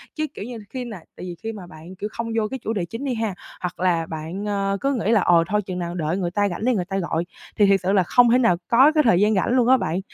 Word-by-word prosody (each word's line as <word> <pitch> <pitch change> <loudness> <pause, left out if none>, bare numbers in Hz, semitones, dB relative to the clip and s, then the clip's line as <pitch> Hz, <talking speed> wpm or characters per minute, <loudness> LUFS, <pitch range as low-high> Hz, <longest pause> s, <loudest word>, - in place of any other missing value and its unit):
Chứ, 310 - -1
kiểu 205 - -7
như, 245 -1 -7
khi 255 -2 -5
nà 215 -5 -7 0.2
tại - - -8
vì 175 -1 -6
khi 225 - -3
mà 200 -5 -9
bạn, 165 +3 -12
kiểu, 210 +3 -5
không 230 0 -4
vô 215 -1 +1
cái 265 +2 -6
chủ 225 0 -3
đề 185 -5 -2
chính 230 +9 -7
đi 260 - -1
ha, 225 -4 -2 0.3
hoặc 180 -1 -4
là 170 -3 +1
bạn, 165 +6 -6
ờ, 200 -1 -1
cứ 275 0 +1
nghĩ 225 -3 0
là 215 -4 +4
"Ờ, 170 -2 +4
thôi 210 0 +1
chừng 185 -2 -5
nào 175 0 -4
đợi 165 +2 -1
người 175 -3 -2
ta 205 +1 +1
rảnh 180 +5 -4
đi 255 - +3
người 180 -5 -1
ta 195 0 -3
gọi." 170 -2 -1 0.3
Thì 205 - +5
thiệt 195 -1 +4
sự 190 - +1
là 195 -2 +4
không 245 +6 +4
thể 250 - +5
nào 230 -9 +3
có 265 +6 +6
cái 310 -1 +3
thời 205 -7 +4
gian 215 +1 +3
rảnh 190 - +1
luôn 245 -2 +3
á 260 - +6
bạn. 170 -5 -2
200 Hz, 315 wpm, -22 LUFS, 180-230 Hz, 0.3 s, có